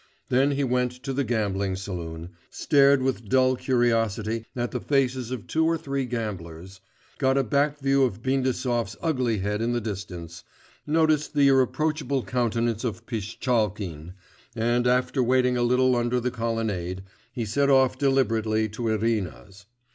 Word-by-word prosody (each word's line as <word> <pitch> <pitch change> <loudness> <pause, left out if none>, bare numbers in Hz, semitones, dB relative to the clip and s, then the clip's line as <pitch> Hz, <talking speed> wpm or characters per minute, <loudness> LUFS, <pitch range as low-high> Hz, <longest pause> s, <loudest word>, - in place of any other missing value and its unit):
Then 135 +3 +3
he 140 +1 0
went 125 -1 0
to 135 - -3
the 140 +1 0
gambling 100 -5 -1
saloon, 85 -3 -6 0.2
stared 140 -2 +3
with 120 -5 -2
dull 130 +1 +4
curiosity 115 -3 0
at 120 -1 -2
the 125 - -2
faces 130 -4 0
of 125 -4 -5
two 160 - 0
or 165 0 +2
three 140 -3 -3
gamblers, 95 -6 -6 0.4
got 135 -1 +2
a 135 - +3
back 145 +4 +1
view 135 -1 +2
of 115 -3 -1
Bindasov's 130 -3 -1
ugly 130 -9 0
head 105 +2 -1
in 120 +1 0
the 120 - 0
distance, 90 -6 -7 0.4
noticed 155 -1 +2
the 140 -1 +5
irreproachable 140 0 +1
countenance 115 0 -1
of 110 -7 -4
Pishtchalkin, 105 - -2 0.4
and 120 +2 +1
after 125 +2 +1
waiting 125 0 +2
a 120 - 0
little 125 +1 +3
under 120 +1 +1
the 125 +1 -2
colonnade, 110 -6 -3 0.3
he 120 -2 -3
set 140 +7 +1
off 130 -2 +4
deliberately 115 -6 +1
to 115 +3 -4
Irina's. 105 -2 -2
120 Hz, 150 wpm, -25 LUFS, 105-130 Hz, 0.4 s, the